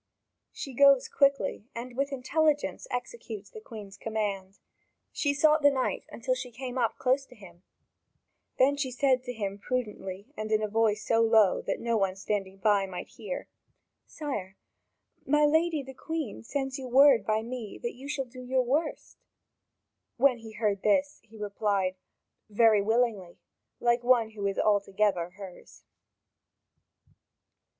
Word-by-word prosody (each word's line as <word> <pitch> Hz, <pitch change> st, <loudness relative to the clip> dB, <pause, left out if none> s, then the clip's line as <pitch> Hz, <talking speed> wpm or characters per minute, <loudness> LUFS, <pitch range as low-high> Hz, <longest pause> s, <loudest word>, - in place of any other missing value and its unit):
She 270 Hz, -, -7 dB
goes 275 Hz, 0 st, +6 dB
quickly, 275 Hz, -5 st, +1 dB
and 240 Hz, +1 st, -7 dB
with 275 Hz, +2 st, -1 dB
intelligence 290 Hz, +3 st, 0 dB
executes 405 Hz, -, -6 dB
the 440 Hz, -3 st, -10 dB
Queen's 205 Hz, -, -10 dB
command. 200 Hz, -3 st, -3 dB, 0.5 s
She 285 Hz, -, 0 dB
sought 305 Hz, +2 st, +4 dB
the 285 Hz, -, +7 dB
knight 265 Hz, -2 st, -2 dB
until 255 Hz, +2 st, -1 dB
she 255 Hz, 0 st, -5 dB
came 250 Hz, +1 st, -7 dB
up 240 Hz, -3 st, 0 dB
close 260 Hz, +2 st, +2 dB
to 250 Hz, -, -16 dB
him; 175 Hz, -5 st, -15 dB, 1.0 s
then 280 Hz, +2 st, +4 dB
she 280 Hz, -2 st, -1 dB
said 255 Hz, 0 st, +2 dB
to 245 Hz, -, -3 dB
him 200 Hz, -4 st, -4 dB
prudently 210 Hz, -1 st, -4 dB
and 215 Hz, 0 st, -5 dB
in 215 Hz, 0 st, +2 dB
a -, -, +1 dB
voice 220 Hz, 0 st, +1 dB
so 230 Hz, 0 st, +3 dB
low 220 Hz, -4 st, +4 dB
that 195 Hz, -, -1 dB
no 235 Hz, -1 st, 0 dB
one 195 Hz, -2 st, 0 dB
standing 195 Hz, -1 st, -3 dB
by 200 Hz, -1 st, +2 dB
might 180 Hz, -2 st, -7 dB
hear: -, -, -6 dB, 0.6 s
"Sire, 210 Hz, -, -5 dB, 0.7 s
my 295 Hz, +2 st, +3 dB
lady 320 Hz, 0 st, +2 dB
the 265 Hz, 0 st, -10 dB
Queen 310 Hz, -5 st, -5 dB
sends 270 Hz, +2 st, -3 dB
you 260 Hz, -, -6 dB
word 260 Hz, -2 st, +6 dB
by 215 Hz, +2 st, 0 dB
me 235 Hz, -3 st, -6 dB
that 240 Hz, -, -4 dB
you 265 Hz, +3 st, -10 dB
shall 270 Hz, -2 st, -2 dB
do 255 Hz, +1 st, -11 dB
your 255 Hz, +1 st, +1 dB
'worst'." 295 Hz, +6 st, -2 dB, 1.0 s
When 255 Hz, -1 st, +4 dB
he 225 Hz, -1 st, -11 dB
heard 210 Hz, -3 st, 0 dB
this, 280 Hz, +8 st, +1 dB
he 225 Hz, -1 st, -17 dB
replied: 200 Hz, -2 st, -1 dB, 0.5 s
"Very 215 Hz, -1 st, +5 dB
willingly," 220 Hz, -4 st, 0 dB, 0.4 s
like 240 Hz, 0 st, +2 dB
one 240 Hz, -3 st, +3 dB
who 205 Hz, -2 st, -3 dB
is 195 Hz, -, -2 dB
altogether 200 Hz, -3 st, +1 dB
hers. 195 Hz, -3 st, -12 dB
235 Hz, 150 wpm, -28 LUFS, 205-270 Hz, 1.0 s, the